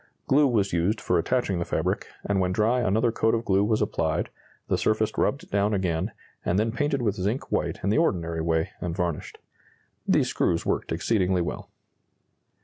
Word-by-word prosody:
Glue 145 +2 +4
was 105 -7 +1
used 90 +6 +1
for 90 -4 +1
attaching 95 -1 0
the - - 0
fabric, - - -1 0.2
and 100 -1 +1
when 90 -1 +1
dry 110 +6 +2
another 115 +2 +2
coat 110 0 +2
of 115 0 -3
glue 95 +1 +3
was 105 0 +2
applied, 80 -7 -1 0.4
the - - +1
surface 110 0 +1
rubbed 155 +7 -1
down 100 +1 +2
again, 90 +1 -1 0.3
and 90 - +1
then 110 +2 +1
painted 140 +1 -1
with 105 -4 +1
zinc 105 +7 -3
white - - 0
in 100 - +1
the 110 - +3
ordinary 85 - 0
way 80 0 0
and 85 -2 -3
varnished. 85 -4 -3 0.7
These - - +3
screws 85 - 0
worked - - -1
exceedingly 90 +1 +1
well." - - -5
100 Hz, 180 wpm, -26 LUFS, 90-115 Hz, 0.7 s, Glue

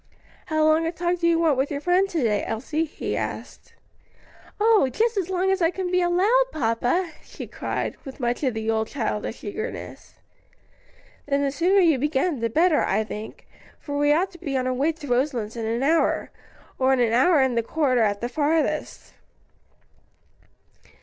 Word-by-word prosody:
"How 310 -1 +1
long 315 +1 +3
a - - -1
talk 350 +1 -1
do 340 - +1
you 335 -1 +3
want 320 -5 +2
with 270 +2 0
your 285 - -3
friend 360 +5 +2
to 330 -7 -1
day, 210 -3 +1
Elsie?" 300 +8 -2
he 310 - -5
asked. - - -6 0.8
"Oh, 430 -9 +4
just 455 - 0
as 380 -3 -2
long 380 +1 +1
as 385 -1 0
I 330 - +4
can 365 0 -4
be 365 0 +2
allowed, 385 +8 +3
papa!" 250 +7 0
she - - -9
cried, - - -4
with 270 0 -10
much 245 -1 -1
of 260 -6 0
the 220 0 -4
old 220 0 0
childish 225 -3 -4
eagerness. 435 +4 -7 1.1
"Then 280 0 +1
the 275 - 0
sooner 365 +7 +3
you 320 -7 +3
begin, 295 +1 0
the 230 0 -1
better, 320 +5 +3
I 220 - +1
think, 215 0 -8 0.3
for 285 - -6
we 290 0 +2
ought 360 +6 +2
to 345 - -15
be 280 -6 -2
on 255 - -1
our 255 - 0
way 280 +6 +1
to 305 -2 -11
Roselands 245 -4 -1
in 225 -1 -3
an 230 +3 -1
hour, 320 +4 +1 0.5
or 265 0 +3
an 240 -3 +2
hour 295 +7 +4
and 260 -2 +1
a - - +2
quarter 255 0 +1
at 205 -2 +1
the 240 - -1
farthest." 305 +3 -1
295 Hz, 185 wpm, -24 LUFS, 250-350 Hz, 1.1 s, Oh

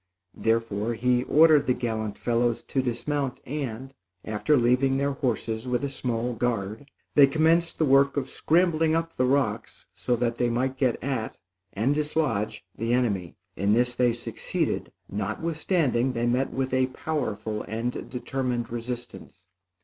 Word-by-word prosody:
Therefore 115 0 0
he 125 +2 +1
ordered 155 -2 +5
the 125 - +3
gallant 110 -4 -3
fellows 120 -1 0
to 135 - -1
dismount, 130 +2 -2
and 135 -2 -5 0.3
after 110 +8 +2
leaving 125 +2 +3
their 140 +1 +1
horses 120 -4 -2
with 125 0 0
a 140 - -2
small 125 -2 -2
guard, 115 +1 -2 0.2
they 140 -2 +7
commenced 165 +3 +2
the 160 - +2
work 140 +1 +4
of 135 -2 -1
scrambling 160 0 +2
up 165 0 -1
the 130 - +2
rocks 125 -5 -1
so 125 - 0
that 120 0 -1
they 120 - +2
might 130 +3 0
get 130 -3 +1
at, 130 -5 -3 0.4
and 110 +8 +1
dislodge 150 -8 -1
the 115 +2 -1
enemy. 100 -9 0 0.2
In 100 +2 +2
this 125 +2 +2
they 125 0 +3
succeeded, 120 0 -3 0.2
notwithstanding 130 - 0
they 115 0 -1
met 125 +3 +1
with 130 0 -2
a 130 0 +3
powerful 110 -7 -3
and 115 +3 -3
determined 125 -2 -3
resistance. 120 -5 -7
125 Hz, 150 wpm, -26 LUFS, 115-140 Hz, 0.4 s, they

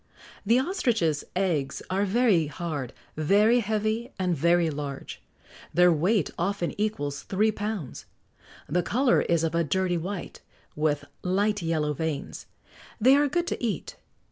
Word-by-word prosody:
The 225 +4 +4
ostrich's 240 - 0
eggs 165 -8 -1
are 195 +2 +1
very 200 -6 +3
hard, 145 -4 -4 0.2
very 205 +10 +4
heavy, 220 +3 -1
and 180 -2 0
very 170 +1 +3
large; 140 -2 -6 0.5
their 180 0 +6
weight 180 +4 +1
often 180 0 -1
equals 145 -10 -2
three 215 +3 +1
pounds. 205 - -5 0.6
The 175 +5 +1
colour 250 +7 +2
is 170 -1 +1
of 165 0 0
a 170 0 +2
dirty 175 +3 0
white, 185 +3 -6 0.3
with 150 -1 0 0.2
light 205 +3 +1
yellow 155 -3 0
veins; 155 -1 -4 0.5
they 260 +5 +6
are 290 +1 +3
good 345 +5 0
to 345 - -4
eat. 210 -9 -2
180 Hz, 140 wpm, -26 LUFS, 155-215 Hz, 0.6 s, their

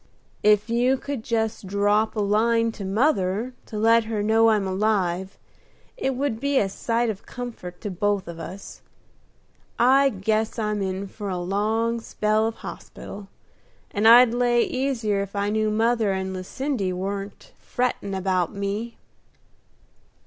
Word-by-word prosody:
"If 210 0 +4
you 245 +3 +2
could 275 -3 -5
just 225 -3 -2
drop 205 +3 +1
a 215 - 0
line 230 +3 +2
to 220 - -8
mother 205 +1 0
to 215 - -6
let 225 +1 +4
her 220 -2 -2
know 225 +1 +4
I'm 210 -3 +2
alive, 190 -2 0 0.6
it 265 -1 -1
would 260 -4 -1
be 280 +1 0
a 200 -6 +2
sight 230 +3 0
of 200 - -11
comfort 225 -8 -7
to 205 - -4
both 200 0 -1
of 170 -1 -8
us. 190 +4 -9 1.0
I 270 +4 +5
guess 215 +1 -1
I'm 210 -2 -1
in 190 0 -2
for 205 +1 -7
a 185 - -2
long 215 +6 0
spell 215 0 0
of 225 - -4
hospital, 200 -1 -9 0.6
and 210 +2 +2
I'd 235 +1 +8
lay 240 -1 +3
easier 235 -7 -1
if 200 0 -6
I 200 0 0
knew 215 0 +1
mother 225 -1 +2
and 190 0 -3
Lucindy 195 +2 -3
warn't 195 +2 -5
frettin' 245 -5 -2
about 185 -2 0
me." 200 +4 -3
215 Hz, 150 wpm, -24 LUFS, 195-230 Hz, 1.0 s, I'd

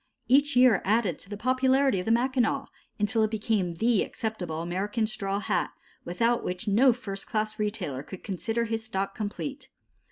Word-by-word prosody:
Each 285 +2 +4
year 250 -4 +6
added 205 -5 +1
to - - -14
the 205 - -5
popularity 260 0 +2
of 180 - -4
the - - +3
Mackinaw, 255 +2 +1 0.3
until 215 +2 +1
it 215 - +3
became 210 -5 0
the 225 +3 +2
acceptable 180 -8 -4
American 200 +6 -1
straw 200 -2 -2
hat, 180 -3 0 0.4
without 230 +7 +1
which 180 +3 -4
no 240 +6 +5
first 200 -5 -6
class 215 0 -2
retailer 200 - -2
could 185 +5 -10
consider 225 +4 -2
his 225 0 -2
stock 195 -3 -3
complete. 260 +7 -5
215 Hz, 165 wpm, -27 LUFS, 195-240 Hz, 0.4 s, year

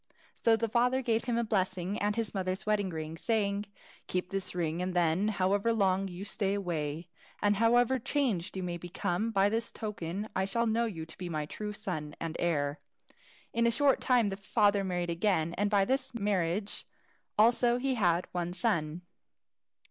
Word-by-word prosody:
So 230 -1 +3
the 230 +1 -1
father 250 +3 +2
gave 230 -1 +1
him 240 -2 0
a 235 - +2
blessing, 190 -2 -1
and 205 0 +1
his 225 -2 -2
mother's 185 -1 -2
wedding 210 -2 +1
ring, 160 -1 -5
saying, 205 -3 0 0.4
"Keep 180 +1 -2
this 195 -2 -3
ring, 170 -1 -1
and 180 0 -2
then, 175 +3 +2
however 200 +2 +1
long 195 -3 +2
you 185 +1 -7
stay 200 -1 -1
away, 165 -4 -3 0.3
and 205 0 +2
however 240 +3 +4
changed 220 - -1
you 190 - -3
may 175 -1 -3
become, 175 +4 -2
by 200 -3 +3
this 225 +2 -1
token 205 -2 -4
I 190 - +1
shall 230 +4 0
know 230 +1 +2
you 165 -8 -5
to 160 - -11
be 180 -1 -4
my 155 -2 -2
true 210 +7 -5
son 180 -8 -5
and 165 -1 -4
heir." 150 -2 0 0.7
In 235 0 +3
a - - +5
short 275 +3 +3
time 245 -5 +3
the 195 - -4
father 205 0 +2
married 175 -2 -1
again, 170 -2 +1
and 205 +3 0
by 200 -2 +3
this 265 +1 -1
marriage 200 -2 -1 0.5
also 235 +2 +4
he 265 +1 0
had 180 -7 +2
one 175 -1 -2
son. 175 -6 0
200 Hz, 180 wpm, -31 LUFS, 175-225 Hz, 0.7 s, a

